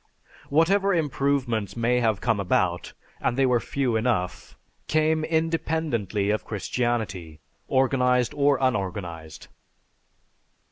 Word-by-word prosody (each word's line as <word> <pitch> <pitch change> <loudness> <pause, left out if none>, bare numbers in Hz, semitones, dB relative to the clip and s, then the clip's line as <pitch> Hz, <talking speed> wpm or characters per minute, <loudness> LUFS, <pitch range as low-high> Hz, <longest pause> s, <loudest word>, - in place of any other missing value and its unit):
Whatever 195 +6 +3
improvements 135 - -1
may 120 +2 +2
have 110 -4 +1
come 115 -4 +1
about, 90 -2 0 0.3
and 120 - -1
they 135 - +4
were 125 -2 +3
few 130 -1 -1
enough, 110 -6 -2 0.3
came 155 0 +2
independently 160 - -1
of 105 -3 -1
Christianity, 105 -7 -3 0.3
organized 125 -2 +2
or 145 -1 +3
unorganized. 90 - -3
120 Hz, 100 wpm, -25 LUFS, 100-140 Hz, 0.3 s, they